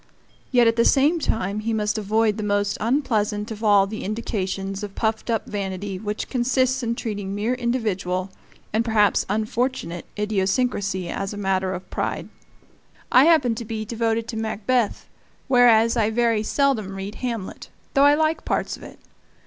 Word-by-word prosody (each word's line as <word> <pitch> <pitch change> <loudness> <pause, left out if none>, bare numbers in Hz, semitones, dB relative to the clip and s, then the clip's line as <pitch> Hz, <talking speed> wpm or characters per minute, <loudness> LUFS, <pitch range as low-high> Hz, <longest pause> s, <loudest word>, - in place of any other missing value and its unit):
Yet 245 -2 +5
at 230 0 +3
the 230 - +5
same 295 +8 +4
time 210 -7 -1
he 225 +1 -2
must 210 -1 0
avoid 215 0 +1
that - - -3
most 205 0 0
unpleasant 215 -4 0
of 220 0 -7
all 205 -2 +5
the 215 +2 -6
indications 195 -2 -3
of 205 -2 -7
puffed 220 +1 -1
up 225 -2 0
vanity 195 -1 -4
which 210 +1 -4
consists 255 +1 +1
in 235 -1 -1
treating 205 -4 -4
mere 215 +4 0
individual, 200 -7 -1 0.4
and 220 +2 +2
perhaps 215 -3 +2
unfortunate, 215 -4 -2
idiosyncrasy 195 -2 0
as 195 +3 -3
a - - -7
matter 190 -2 0
of 185 - -8
pride. - - -3 0.8
I 255 +3 +7
happen 310 -8 +4
to 225 - -5
be 220 -1 -4
devoted 225 0 -1
to 225 - -4
Macbeth, 220 +1 -1 0.4
whereas 235 -3 +5
I 220 -2 +2
very 230 -1 +2
seldom 220 -5 0
read 195 +1 -5
Hamlet 230 -6 -5 0.2
(though 275 0 +5
I 290 0 +6
like 315 +1 0
parts - - -1
of - - -16
it). - - -11
220 Hz, 165 wpm, -23 LUFS, 200-240 Hz, 0.8 s, I